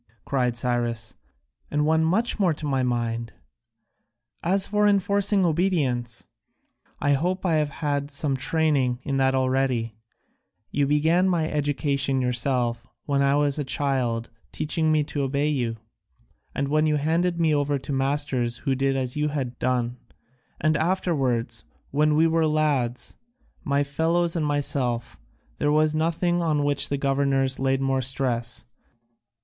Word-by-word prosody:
cried 125 Hz, -3 st, 0 dB
Cyrus, 120 Hz, -2 st, -2 dB, 0.6 s
"and 150 Hz, 0 st, 0 dB
one 160 Hz, +1 st, +3 dB
much 215 Hz, +9 st, +1 dB
more 180 Hz, -6 st, +2 dB
to 150 Hz, -, -7 dB
my 135 Hz, -2 st, 0 dB
mind! 115 Hz, -2 st, -2 dB, 1.1 s
As 190 Hz, +3 st, +2 dB
for 210 Hz, 0 st, +2 dB
enforcing 200 Hz, -1 st, +2 dB
obedience, 145 Hz, -9 st, 0 dB, 0.7 s
I 145 Hz, 0 st, +2 dB
hope 180 Hz, +7 st, -1 dB
I 165 Hz, -3 st, +2 dB
have 150 Hz, -1 st, +1 dB
had 145 Hz, -1 st, -2 dB
some 145 Hz, -1 st, -1 dB
training 135 Hz, -3 st, +1 dB
in 140 Hz, -2 st, -1 dB
that 135 Hz, 0 st, +2 dB
already; 130 Hz, -3 st, 0 dB, 0.8 s
you 145 Hz, -1 st, +1 dB
began 160 Hz, +6 st, +3 dB
my 165 Hz, -3 st, +1 dB
education 140 Hz, -2 st, 0 dB
yourself 125 Hz, -1 st, 0 dB, 0.2 s
when 140 Hz, -1 st, +1 dB
I 140 Hz, 0 st, +3 dB
was 145 Hz, 0 st, +1 dB
a -, -, 0 dB
child 130 Hz, -5 st, -1 dB
by 115 Hz, -, -38 dB
teaching 155 Hz, +1 st, 0 dB
me 155 Hz, -1 st, +3 dB
to 145 Hz, 0 st, -4 dB
obey 140 Hz, +2 st, 0 dB
you, 120 Hz, -6 st, -1 dB, 0.8 s
and 140 Hz, +1 st, -2 dB
then 155 Hz, 0 st, +3 dB
you 150 Hz, -, +2 dB
handed 170 Hz, +4 st, 0 dB
me 160 Hz, -2 st, +3 dB
over 145 Hz, -1 st, +1 dB
to 135 Hz, +1 st, -6 dB
masters 135 Hz, -3 st, 0 dB
who 135 Hz, -, +2 dB
did 135 Hz, +1 st, 0 dB
as 130 Hz, -2 st, -2 dB
you 150 Hz, 0 st, 0 dB
had 135 Hz, -5 st, -4 dB
done, 125 Hz, -1 st, -1 dB, 0.6 s
and 155 Hz, +1 st, +2 dB
afterwards, 135 Hz, -10 st, 0 dB, 0.3 s
when 150 Hz, +1 st, +2 dB
we 160 Hz, +2 st, +4 dB
were 165 Hz, -1 st, +2 dB
lads, 145 Hz, -6 st, 0 dB, 0.5 s
my 140 Hz, 0 st, +1 dB
fellows 165 Hz, +4 st, 0 dB
and 155 Hz, -3 st, 0 dB
myself, 135 Hz, -5 st, -1 dB, 0.4 s
there 145 Hz, -, +2 dB
was 155 Hz, 0 st, +3 dB
nothing 170 Hz, +2 st, 0 dB
on 155 Hz, -3 st, +1 dB
which 145 Hz, -1 st, +2 dB
the 140 Hz, -, 0 dB
governors 135 Hz, -1 st, +1 dB
laid 135 Hz, 0 st, +1 dB
more 135 Hz, -1 st, +1 dB
stress. 125 Hz, -2 st, -2 dB
140 Hz, 150 wpm, -25 LUFS, 130-155 Hz, 1.1 s, we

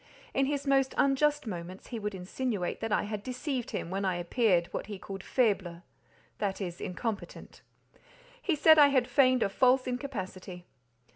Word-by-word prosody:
In 270 Hz, 0 st, +2 dB
his 285 Hz, 0 st, -2 dB
most 270 Hz, -1 st, +2 dB
unjust 290 Hz, +1 st, +2 dB
moments 185 Hz, -2 st, -7 dB
he 235 Hz, -, -4 dB
would 210 Hz, -1 st, -4 dB
insinuate 190 Hz, +1 st, -3 dB
that 225 Hz, -, -3 dB
I -, -, +2 dB
had 210 Hz, 0 st, -4 dB
deceived 255 Hz, +2 st, -4 dB
him 170 Hz, -, -4 dB
when 195 Hz, +1 st, -2 dB
I 185 Hz, -2 st, +1 dB
appeared, 175 Hz, 0 st, +2 dB
what -, -, -4 dB
he 205 Hz, -2 st, -6 dB
called 195 Hz, 0 st, -8 dB
"faible"—that 195 Hz, -2 st, -3 dB
is 175 Hz, -3 st, -5 dB
incompetent; 210 Hz, +3 st, -5 dB, 0.8 s
he 360 Hz, -8 st, +1 dB
said 315 Hz, +1 st, +6 dB
I 290 Hz, -, +9 dB
had 260 Hz, -3 st, +2 dB
feigned 255 Hz, -3 st, +4 dB
a -, -, 0 dB
false 255 Hz, +5 st, +3 dB
incapacity. 190 Hz, -9 st, -5 dB
225 Hz, 160 wpm, -30 LUFS, 190-265 Hz, 0.8 s, I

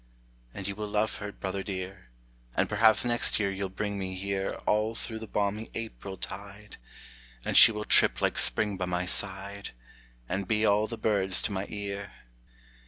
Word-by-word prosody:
And 100 Hz, +6 st, -6 dB
you 100 Hz, -, -3 dB
will 105 Hz, +1 st, -5 dB
love 105 Hz, +1 st, 0 dB
her, 105 Hz, 0 st, -6 dB
brother 95 Hz, 0 st, -4 dB
dear, 95 Hz, -5 st, -6 dB, 0.5 s
And -, -, +2 dB
perhaps 110 Hz, +1 st, +4 dB
next 120 Hz, -2 st, +3 dB
year 100 Hz, -2 st, 0 dB
you'll 95 Hz, 0 st, -3 dB
bring 100 Hz, +1 st, -3 dB
me 95 Hz, -1 st, -4 dB
here 95 Hz, +1 st, -2 dB
All 105 Hz, +2 st, +1 dB
through 110 Hz, -1 st, -6 dB
the 110 Hz, -, -8 dB
balmy 105 Hz, +2 st, -2 dB
April 110 Hz, -4 st, -6 dB
tide, 100 Hz, +3 st, -8 dB, 0.7 s
And -, -, -2 dB
she 120 Hz, -, +10 dB
will 105 Hz, -1 st, -5 dB
trip -, -, +5 dB
like -, -, +2 dB
spring 105 Hz, -2 st, +4 dB
by 90 Hz, -, -2 dB
my 90 Hz, 0 st, -2 dB
side, 100 Hz, +2 st, -2 dB, 0.5 s
And 95 Hz, +4 st, -3 dB
be 110 Hz, 0 st, +2 dB
all 105 Hz, +1 st, +3 dB
the 115 Hz, -, -6 dB
birds 95 Hz, -4 st, +2 dB
to 110 Hz, -, -1 dB
my 95 Hz, 0 st, -3 dB
ear. 100 Hz, -1 st, -5 dB
100 Hz, 175 wpm, -28 LUFS, 95-105 Hz, 0.7 s, she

